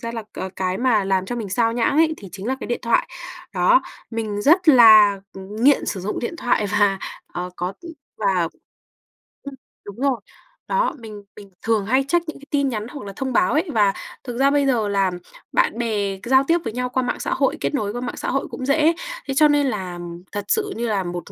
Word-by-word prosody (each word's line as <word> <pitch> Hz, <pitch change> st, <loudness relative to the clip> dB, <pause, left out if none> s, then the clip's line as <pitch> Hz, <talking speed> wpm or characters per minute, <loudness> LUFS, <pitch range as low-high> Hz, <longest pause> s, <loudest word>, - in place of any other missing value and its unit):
ra 230 Hz, 0 st, -5 dB
là, 225 Hz, -1 st, -4 dB
ờ, 190 Hz, -, -4 dB
cái 185 Hz, 0 st, -1 dB
mà 230 Hz, -5 st, +2 dB
làm 190 Hz, -1 st, 0 dB
cho 245 Hz, -, -4 dB
mình 215 Hz, -4 st, -4 dB
xao 230 Hz, +3 st, +1 dB
nhãng 240 Hz, +4 st, +1 dB
ấy, 315 Hz, 0 st, +4 dB
thì 200 Hz, -, -11 dB
chính 195 Hz, +2 st, -7 dB
là 265 Hz, +2 st, -1 dB
cái -, -, -5 dB
điện 240 Hz, -, -2 dB
thoại. 235 Hz, -1 st, +1 dB, 0.5 s
Đó, -, -, +4 dB, 0.3 s
mình 215 Hz, -2 st, -3 dB
rất 340 Hz, +3 st, +4 dB
là 215 Hz, -6 st, +8 dB
nghiện 215 Hz, +9 st, +1 dB
sử 195 Hz, -, -3 dB
dụng 200 Hz, +4 st, -3 dB
điện 295 Hz, +8 st, -4 dB
thoại 240 Hz, -7 st, +1 dB
và, 200 Hz, -1 st, +2 dB, 0.3 s
ờ, 180 Hz, +1 st, -4 dB
có, 180 Hz, +2 st, -3 dB
ừm 340 Hz, -1 st, -9 dB, 0.2 s
và 180 Hz, -4 st, +1 dB, 1.0 s
ừm, 280 Hz, -1 st, -8 dB, 0.3 s
đúng 205 Hz, -, -8 dB
rồi, 270 Hz, -3 st, +1 dB, 0.5 s
đó, -, -, +1 dB
mình 210 Hz, -3 st, -10 dB
mình 200 Hz, -2 st, -13 dB
thường 220 Hz, -3 st, +1 dB
hay 260 Hz, +5 st, +2 dB
check 340 Hz, +3 st, +1 dB
những -, -, -7 dB
cái 280 Hz, -, -14 dB
tin 280 Hz, -2 st, +1 dB
nhắn 215 Hz, -2 st, -4 dB
hoặc 265 Hz, -4 st, -9 dB
là 195 Hz, -, -7 dB
thông 260 Hz, +2 st, -3 dB
báo 355 Hz, +1 st, +3 dB
ấy. 320 Hz, +4 st, +1 dB
Và 205 Hz, -3 st, +3 dB, 0.3 s
thực 245 Hz, -2 st, -6 dB
ra 275 Hz, +1 st, +4 dB
bây 285 Hz, -1 st, +2 dB
giờ, 235 Hz, -6 st, +1 dB
là 195 Hz, -2 st, +1 dB, 0.4 s
bạn -, -, +1 dB
bè 205 Hz, -5 st, -1 dB
giao 265 Hz, +2 st, +4 dB
tiếp 335 Hz, -, +4 dB
với 225 Hz, -, -4 dB
nhau 250 Hz, 0 st, -2 dB
qua 255 Hz, +1 st, 0 dB
mạng 245 Hz, -, -2 dB
xã -, -, -2 dB
hội, -, -, +1 dB
kết -, -, -1 dB
nối 210 Hz, -7 st, -1 dB
qua 245 Hz, -, -4 dB
mạng 245 Hz, -, -5 dB
xã -, -, -3 dB
hội 275 Hz, +1 st, -1 dB
cũng 260 Hz, -, -5 dB
dễ. 305 Hz, +4 st, +3 dB, 0.3 s
Thế 270 Hz, -, -1 dB
cho 300 Hz, +2 st, +5 dB
nên 290 Hz, -1 st, +3 dB
là 185 Hz, -6 st, -4 dB, 0.3 s
thật 205 Hz, -1 st, -4 dB
sự, 415 Hz, -2 st, 0 dB
như 235 Hz, +1 st, -2 dB
là 200 Hz, -3 st, 0 dB
một 175 Hz, 0 st, -6 dB
230 Hz, 230 wpm, -22 LUFS, 200-275 Hz, 1.0 s, là